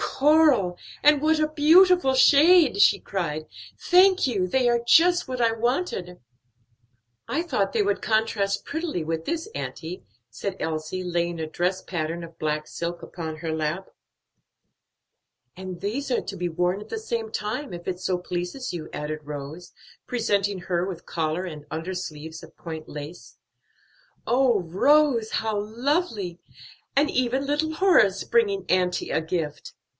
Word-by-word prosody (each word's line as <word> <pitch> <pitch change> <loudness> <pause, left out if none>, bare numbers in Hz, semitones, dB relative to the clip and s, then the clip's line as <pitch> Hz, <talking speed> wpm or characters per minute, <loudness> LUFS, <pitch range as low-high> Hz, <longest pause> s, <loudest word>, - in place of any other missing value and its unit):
"Coral! 280 - +3 0.3
and 295 0 +6
what 310 +1 +2
a 305 - +2
beautiful 320 0 +5
shade!" 295 - +6
she - - +6
cried. 155 -5 -4 0.3
"Thank 370 -1 +4
you; 195 -7 0
they 250 +5 +2
are 235 0 +2
just 350 +8 +5
what 255 -1 -3
I 230 -1 +4
wanted." 225 - -2 1.1
"I 315 - -1
thought 205 - -1
they 225 - +2
would 200 0 0
contrast 215 -2 0
prettily 315 - -3
with 160 +1 -3
this, 335 +4 -3
auntie," 170 +3 -6 0.3
said 185 - -5
Elsie, 160 +3 -3
laying 175 -1 -2
a 160 - -3
dress 180 +4 -1
pattern 170 -1 -3
of 165 0 -11
black 155 0 -2
silk 170 0 -5
upon 160 -2 -6
her 165 0 -4
lap. 160 +4 -3 1.7
"And 185 -2 -8
these 250 +8 -3
are 245 - +1
to 195 - -7
be 175 0 -2
worn 180 +4 -1
at - - -11
the 450 - -4
same 230 - -4
time, 225 +5 -4
if 175 0 -8
it 180 -1 -3
so 185 -1 -1
pleases 180 +8 -4
you," 160 -3 -6
added 150 +1 -4
Rose, 150 +4 -8 0.4
presenting 205 -5 0
her 175 -1 -1
with 175 -3 -7
collar 165 +2 -2
and 150 -4 -8
undersleeves 160 -2 -6
of - - -15
point 160 -2 -7
lace. 150 +4 -9 0.9
"Oh, 245 -4 +3
Rose, 235 - +3
how 220 -2 -1
lovely! 220 - -2 0.6
and 285 +2 +3
even 255 +2 0
little 300 +3 0
Horace 245 - +4
bringing 200 -5 +1
auntie 180 -1 +1
a - - +1
gift!" 160 -3 -4
195 Hz, 150 wpm, -25 LUFS, 170-265 Hz, 1.7 s, and